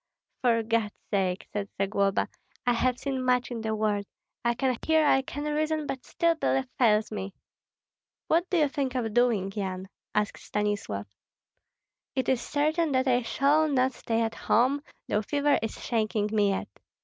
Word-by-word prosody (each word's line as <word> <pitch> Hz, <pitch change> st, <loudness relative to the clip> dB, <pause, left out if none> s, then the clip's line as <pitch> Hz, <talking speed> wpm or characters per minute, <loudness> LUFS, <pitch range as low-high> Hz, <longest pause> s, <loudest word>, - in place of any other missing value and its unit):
"For 230 Hz, -2 st, +3 dB
God's 225 Hz, -2 st, 0 dB, 0.2 s
sake," 190 Hz, -2 st, 0 dB
said 205 Hz, -1 st, -3 dB
Zagloba, 195 Hz, 0 st, +1 dB, 0.4 s
"I 245 Hz, -, +4 dB
have 250 Hz, +1 st, +1 dB
seen 265 Hz, -2 st, -2 dB
much 250 Hz, -1 st, +2 dB
in 235 Hz, -2 st, -3 dB
the 220 Hz, 0 st, -1 dB
world. 210 Hz, -2 st, 0 dB, 0.4 s
I 235 Hz, 0 st, +2 dB
can 260 Hz, 0 st, +1 dB
hear, 315 Hz, -1 st, +4 dB
I 270 Hz, -2 st, +5 dB
can 290 Hz, +2 st, -6 dB
reason, 305 Hz, +1 st, 0 dB
but 260 Hz, -3 st, -4 dB
still 335 Hz, 0 st, +2 dB
belief 270 Hz, -4 st, 0 dB
fails 215 Hz, -3 st, +3 dB
me." 195 Hz, -2 st, -5 dB, 0.9 s
"What 340 Hz, +3 st, +2 dB
do 365 Hz, -, +2 dB
you 300 Hz, -2 st, +4 dB
think 270 Hz, -2 st, -2 dB
of 225 Hz, -4 st, -1 dB
doing, 230 Hz, -5 st, +2 dB
Yan?" 190 Hz, -2 st, -4 dB, 0.3 s
asked 210 Hz, 0 st, 0 dB
Stanislav. 205 Hz, -, -2 dB, 1.1 s
"It 260 Hz, -, 0 dB
is 260 Hz, -2 st, +2 dB
certain 310 Hz, +2 st, +1 dB
that 260 Hz, +1 st, +2 dB
I 250 Hz, -1 st, +3 dB
shall 285 Hz, +6 st, +3 dB
not 260 Hz, -3 st, +2 dB
stay 230 Hz, -1 st, -1 dB
at 225 Hz, 0 st, -1 dB
home, 260 Hz, +5 st, +2 dB, 0.3 s
though 210 Hz, -, +1 dB
fever 285 Hz, +5 st, +2 dB
is 225 Hz, -, -4 dB
shaking 215 Hz, -2 st, 0 dB
me 205 Hz, -2 st, +3 dB
yet. 195 Hz, -, -1 dB
240 Hz, 170 wpm, -28 LUFS, 210-275 Hz, 1.1 s, I